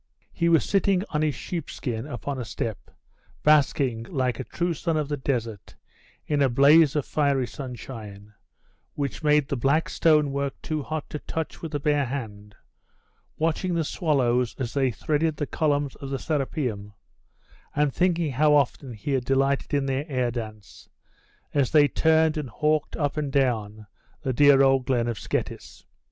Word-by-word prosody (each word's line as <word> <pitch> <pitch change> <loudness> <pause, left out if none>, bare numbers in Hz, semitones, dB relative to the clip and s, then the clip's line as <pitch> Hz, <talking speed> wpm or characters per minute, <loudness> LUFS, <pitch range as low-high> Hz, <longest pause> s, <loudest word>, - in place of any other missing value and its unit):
He 170 -1 +1
was 165 -1 +4
sitting 195 -1 +2
on 150 - 0
his 155 -2 0
sheepskin 135 -7 -5
upon 135 0 -5
a - - -3
step, 110 -2 -5 0.5
basking, 140 -5 +3
like 130 -3 -1
a - - -2
true 175 +6 -2
son 165 0 -1
of 150 -2 -2
the 145 - 0
desert, 115 -6 -3 0.5
in 145 -2 0
a 135 - +4
blaze 145 +4 +5
of 150 - 0
fiery 140 -4 +1
sunshine, 110 -4 -9 0.6
which 140 -3 -3
made 150 -2 +3
the 140 - -2
black 140 +6 +1
stone 150 -3 +3
work 140 0 -3
too 155 -1 -2
hot 155 +2 -4
to 150 - -4
touch 160 +1 -5
with 165 - -6
the 145 - -2
bare 145 0 +1
hand, 105 -6 -6 0.8
watching 165 +3 0
the 165 - +1
swallows, 125 -7 +1
as 125 -3 -4
they 135 -2 +2
threaded 150 +5 -1
the 145 - -1
columns 145 -2 0
of 135 - -7
the 135 - -2
Serapeium, 130 -9 -3 0.8
and 145 -2 +2
thinking 170 -4 +1
how 150 +3 +4
often 135 -2 0
he 110 +6 -5
had 130 -2 +1
delighted 135 +2 +1
in 140 -2 +1
their 135 +3 -2
air 125 -3 0
dance, 110 -4 -8 0.6
as 140 -4 +2
they 150 -2 +5
turned 160 +2 +2
and 150 -4 -4
hawked 150 +4 0
up 145 -1 -1
and 145 -2 -2
down 110 -6 0 0.4
the 130 - -1
dear 140 +1 +6
old 135 -2 +3
glen 120 -3 +1
at 115 -2 -2
Scetis. - - -5
140 Hz, 170 wpm, -25 LUFS, 125-150 Hz, 0.8 s, dear